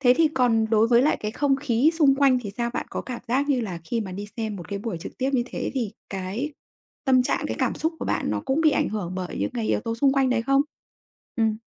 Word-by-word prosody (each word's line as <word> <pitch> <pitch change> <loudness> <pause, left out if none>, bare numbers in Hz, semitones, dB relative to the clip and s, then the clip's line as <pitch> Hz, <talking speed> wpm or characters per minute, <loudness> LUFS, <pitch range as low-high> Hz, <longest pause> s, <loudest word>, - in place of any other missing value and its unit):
thế 250 -2 +5
thì 320 0 +4
còn 245 -5 +2
đối 225 +1 +4
với 240 0 +5
lại 300 - +3
cái 210 - -2
không 275 +3 +1
khí 270 +2 +2
xung 275 -3 +6
quanh 270 -2 +4
thì 205 - -5
sao? 235 0 -1
Bạn - - -2
có - - -3
cảm 250 -2 -6
giác 275 +4 +1
như 260 -3 +2
là 185 -6 -4
khi 230 +6 -1
mà 190 -4 -5
đi 205 +2 -5
xem 220 -3 -3
một 175 - -9
cái 200 - -3
buổi 205 -5 -4
trực 165 - -9
tiếp 265 +1 0
như 245 -2 +3
thế - - -4
thì 230 -5 -2 0.2
cái 195 +10 -3 0.5
tâm 260 -2 +5
trạng, - - -1
cái - - -3
cảm - - +1
xúc 320 +1 -1
của - - -4
bạn - - -1
nó - - -1
cũng 270 +4 +1
bị 310 -2 +5
ảnh - - +1
hưởng 200 -5 -4
bởi 185 -1 -4
những - - -1
cái 225 -2 -2
yếu - - +1
tố 230 +1 -3
xung 270 +3 +3
quanh 270 -2 +2
đấy 240 -2 +1
không? 275 +3 +3 0.7
Ừm. 220 -2 +2
240 Hz, 275 wpm, -25 LUFS, 215-270 Hz, 0.7 s, xung